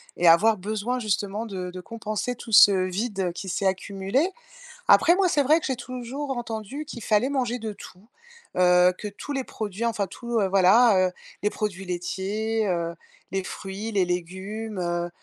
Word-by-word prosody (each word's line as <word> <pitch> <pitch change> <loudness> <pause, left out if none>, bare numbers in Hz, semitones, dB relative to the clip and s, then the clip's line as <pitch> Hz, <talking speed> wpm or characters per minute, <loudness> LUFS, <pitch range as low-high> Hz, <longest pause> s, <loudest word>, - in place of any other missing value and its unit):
et 175 - +2
avoir 210 +7 +6
besoin 215 +6 -2
justement 210 0 -2
de 185 -3 -5
de 185 0 -8
compenser 225 +3 -4
tout 235 -1 -10
ce 205 -1 +9
vide 190 -1 -2
qui 190 +2 -6
s'est 195 - -2
accumulé. 195 - 0 0.6
Après 345 - +6
moi, 375 -1 +3
c'est 290 -4 +2
vrai 305 +5 +4
que - - -4
j'ai 265 - 0
toujours 255 +3 -5
entendu 235 +4 -5
qu'il 245 -6 -8
fallait 215 +4 +2
manger 250 -3 -1
de 220 -2 -5
tout, 200 +2 -14 0.5
heu, 180 0 +5
que 210 - -5
tous 205 +8 -7
les 270 -1 -1
produits, 215 -2 -4
enfin 215 -4 0
tout, 235 +5 -3
heu, 195 - +2
voilà, 195 +1 +5
heu, - - -13 0.3
les 210 - +2
produits 195 -3 -3
laitiers, 205 +5 -2
heu, 170 -2 -1 0.4
les 195 0 -1
fruits, 195 +4 -6
les 195 -2 +3
légumes, 190 +5 -4
heu, 175 0 -1
210 Hz, 175 wpm, -25 LUFS, 185-235 Hz, 0.6 s, ce